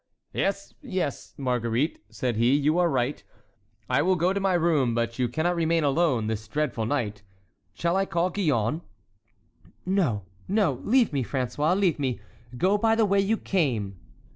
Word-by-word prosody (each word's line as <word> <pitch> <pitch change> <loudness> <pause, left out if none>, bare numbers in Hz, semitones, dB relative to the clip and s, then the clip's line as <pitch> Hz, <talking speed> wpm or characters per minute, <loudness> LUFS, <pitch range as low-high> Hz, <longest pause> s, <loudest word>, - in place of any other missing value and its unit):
"Yes, 195 0 -2
yes, 185 - -4
Marguerite," 125 +2 -1
said 125 -3 -2
he, 120 +4 +4
"you 150 +4 +2
are 175 -1 +3
right, 130 0 -1 0.6
I - - +2
will 185 +4 +3
go 180 +2 +1
to 200 - -1
my 195 -2 +1
room; 155 -8 +2
but 115 +1 -2
you 125 -1 +1
cannot 160 +8 0
remain 165 -1 +1
alone 140 -5 +2
this 110 0 -3
dreadful 125 -4 -1
night. 110 -7 -2 0.5
Shall 170 - 0
I 195 0 +1
call 170 +2 0
Gillonne?" 150 - 0 1.0
"No, 170 - +1 0.2
no! 190 - +1
leave 240 - +3
me, 135 -2 0
François—leave 150 - 0
me. 130 -4 -1 0.4
Go 195 +8 +2
by 225 +1 +3
the 225 -1 +3
way 200 0 +2
you 205 +3 +2
came!" 115 - -1
150 Hz, 160 wpm, -26 LUFS, 125-185 Hz, 1.0 s, he